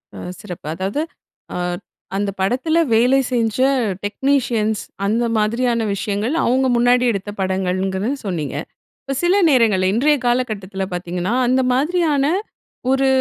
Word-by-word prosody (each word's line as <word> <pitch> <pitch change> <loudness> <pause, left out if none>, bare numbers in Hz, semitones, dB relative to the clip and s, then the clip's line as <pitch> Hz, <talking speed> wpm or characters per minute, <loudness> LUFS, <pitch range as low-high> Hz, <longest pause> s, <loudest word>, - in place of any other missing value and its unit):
அ - - -8 0.2
சிறப்பு. 180 -6 -8
அதாவது 195 - -2 0.5
அ - - -2 0.6
அந்த 200 0 0
படத்துல 255 - +1 0.2
வேலை 250 +4 +4
செஞ்ச 230 -2 0 0.5
டெக்னீஷியன்ஸ், 230 -3 0 0.2
அந்த 225 +4 +1
மாதிரியான 230 +1 +1
விஷயங்கள் 205 +6 -2
அவுங்க 260 +2 +2
முன்னாடி 245 +1 +4
எடுத்த 200 -1 -4
படங்கள்ங்கறத 190 +2 -1 0.2
சொன்னீங்க. 165 -7 -3 0.5
இப்ப 275 - -3
சில 355 +3 +4
நேரங்கள்ல 215 -8 +3
இன்றைய 290 +6 +3
காலகட்டத்துல 215 -6 -1
பாத்தீங்கன்னா, 180 +3 -2
அந்த 255 +2 +3
மாதிரியான 300 0 +1 0.7
ஒரு 270 0 +3
225 Hz, 120 wpm, -20 LUFS, 195-260 Hz, 0.7 s, வேலை